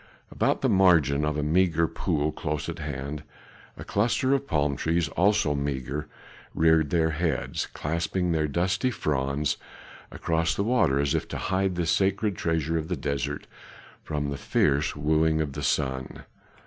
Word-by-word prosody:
About - - 0
the - - +2
margin 80 -7 +4
of 75 0 0
a 75 - -1
meagre 85 +1 +2
pool 75 -1 -1
close 75 -1 -3
at 85 0 -5
hand 75 0 -5 0.6
a - - -7
cluster 120 +5 +1
of 140 0 0
palm 75 -3 +1
trees 80 +4 0
also 95 -4 +2
meagre 70 +1 -3 0.5
reared 80 -2 +4
their 80 -1 +2
heads, 80 -3 -1
clasping 85 +3 -2
their 80 -2 +1
dusty 95 - 0
fronds 70 - -1 0.5
across 80 0 0
the 100 - 0
water 95 - +2
as 70 -1 +1
if - - -1
to - - -5
hide 95 -1 0
this 85 -1 0
sacred 100 +3 +1
treasure 80 -1 0
of 80 - -5
the 90 -1 -2
desert 70 0 -3 0.6
from 75 -2 -3
the 70 - -3
fierce 70 +2 +1
wooing 80 +2 +2
of 75 -3 -2
the 75 - -5
sun. 65 -2 -2
80 Hz, 160 wpm, -26 LUFS, 75-85 Hz, 0.6 s, margin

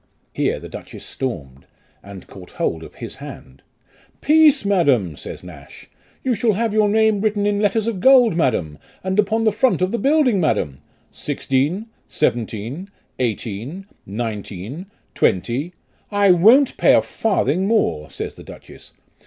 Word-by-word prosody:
Here - - -1
the - - -9
duchess - - -10
stormed, 70 - -6 0.3
and 100 -2 -11
caught 90 -2 -13
hold 80 - -2
of - - -12
his - - -8
hand. 65 +1 -11 0.3
" - - -32
Peace, 305 -5 +5
madam," 140 - +2
says - - -9
Nash, 75 -6 -13 0.3
"you 260 - +1
shall 220 0 +1
have 225 +2 -1
your 215 -1 +3
name 220 -1 +2
written 210 -1 0
in 205 0 +1
letters 215 +1 +1
of 225 -5 -2
gold, 250 -3 +5
madam, 90 - 0 0.2
and 190 +2 -1
upon 220 +2 +2
the 220 - +3
front 240 +5 +2
of 185 +1 0
the 235 - -1
building, 270 -8 +3
madam. 85 - 0 0.3
Sixteen, 145 +11 -1 0.2
seventeen, 120 - -2 0.3
eighteen, 120 - -4 0.2
nineteen, 110 - -5 0.3
twenty." 125 - 0 0.4
"1 200 -4 +3
won't 255 +7 +5
pay - - +5
a - - +3
farthing 190 - 0
more," 140 - 0
says - - -6
the - - -13
duchess. - - -14
180 Hz, 150 wpm, -20 LUFS, -, 0.4 s, Peace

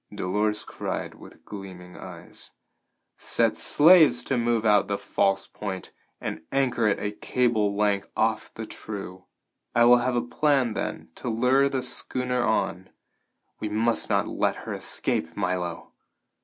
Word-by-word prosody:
Dolores 105 +3 -1
cried - - -4
with - - -16
gleaming 95 -3 -9
eyes. - - -11 0.7
"Set - - +1
slaves 155 -5 +5
to - - -1
move 120 -1 +1
out 105 -1 +4
the 100 - -1
false 95 0 0
Point 95 -3 -6 0.3
and - - -5
anchor 130 -4 +1
it 105 - +2
a 105 - -3
cable 110 -2 0
length 100 -1 +1
off 110 -1 0
the 110 - -5
true. 95 -4 -8 0.5
I 120 - +6
will 120 +1 +8
have 125 +1 0
a 120 - +2
plan 135 -3 +1
then - - -4
to 125 - -5
lure 125 +5 +3
the 130 -2 -2
schooner 125 0 -2
on. 95 -5 -1 0.7
We 110 - -3
must 115 +2 +1
not - - +1
let - - 0
her - - -4
escape, 80 +1 -2
Milo!" 90 -3 -3
110 Hz, 145 wpm, -26 LUFS, 100-125 Hz, 0.7 s, will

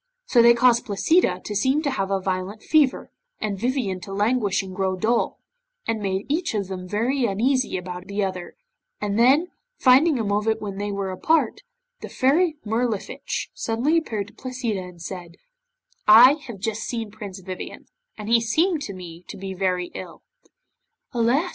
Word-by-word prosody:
So 245 - +4
they 235 0 +7
caused 240 0 +3
Placida 315 - +2
to 210 - -4
seem 265 +9 +2
to 285 - 0
have 195 -5 -2
a 195 -1 +1
violent 190 +2 -3
fever, 300 -4 +2 0.3
and 210 -2 -2
Vivien 235 -5 -1
to 195 - -9
languish 205 -1 +1
and 190 -1 -8
grow 190 -1 0
dull, 225 +5 0 0.5
and 225 -1 -1
made 195 0 -2
each 320 -2 -1
of 200 -3 -2
them 185 -1 -6
very 240 +7 0
uneasy 240 +3 +1
about 180 0 -7
the 200 +1 -1
other, 185 -2 -4 0.4
and 205 +1 -1
then, 280 +9 +4 0.3
finding 275 +4 +5
a 230 - -1
moment 210 +2 0
when 200 -2 -6
they 205 0 -2
were 200 -1 -3
apart, 315 - +1 0.4
the - - -8
Fairy 305 +5 +2
Mirlifiche 225 - -2
suddenly 240 +8 0
appeared 215 -11 -1
to - - -20
Placida, 250 -6 -3
and 180 -1 -11
said 175 -2 -7 0.7
'I 235 +6 +9
have 235 -4 -7
just 215 +2 -3
seen 225 -3 -4
Prince 205 -3 -8
Vivien, 185 0 -7 0.3
and 210 -1 -7
he 230 +1 +4
seemed 315 - +1
to 200 -8 -5
me 175 -2 -10
to - - -8
be 190 0 -5
very 180 -1 -1
ill.' - - -9 0.9
'Alas! 250 +9 +2
215 Hz, 175 wpm, -23 LUFS, 195-255 Hz, 0.9 s, I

